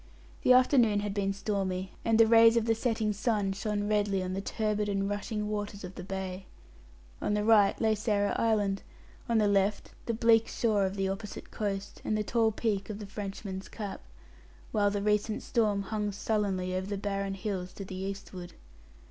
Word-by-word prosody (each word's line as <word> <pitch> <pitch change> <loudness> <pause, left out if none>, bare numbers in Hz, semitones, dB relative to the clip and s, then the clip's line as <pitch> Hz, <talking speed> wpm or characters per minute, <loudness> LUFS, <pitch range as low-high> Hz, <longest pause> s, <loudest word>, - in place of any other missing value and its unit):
The 255 - +6
afternoon 245 -5 +4
had 205 -1 -3
been 195 -1 0
stormy, 195 -2 -2
and 225 -1 +3
the 225 - +8
rays 230 +1 +6
of 230 - +2
the 225 - +3
setting 225 -2 0
sun 205 -2 0
shone 205 +1 -2
redly 205 -2 +1
on 185 0 -3
the 195 - -2
turbid 210 0 -1
and 195 -1 0
rushing 210 +1 -3
waters 205 -1 -4
of 180 0 -7
the 180 - -8
bay. 190 0 -5 0.7
On 210 - 0
the 210 - 0
right 210 -2 +5
lay 220 -1 +3
Sarah 205 -1 0
Island; 205 -4 +1 0.5
on 230 - +3
the 210 -1 +4
left 200 0 +1 0.2
the 230 - 0
bleak 230 0 +4
shore 210 -4 +1
of 190 - -5
the 195 -1 0
opposite 200 0 -5
and 215 - 0
the 210 - 0
tall 225 0 +2
peak 210 -3 -2
of 210 - -4
the 210 - -7
Frenchman's 195 -1 -6
Cap; 205 -3 -6 0.7
while 205 -2 +3
the 210 +1 0
storm 210 -5 +1
hung 210 +1 -2
sullenly 195 -3 -1
over 185 +1 -2
the 200 0 -3
barren 195 -1 -2
hills 190 -2 -4
to 195 - -7
the 190 - -8
eastward. 190 -1 -6
205 Hz, 180 wpm, -30 LUFS, 195-215 Hz, 0.7 s, the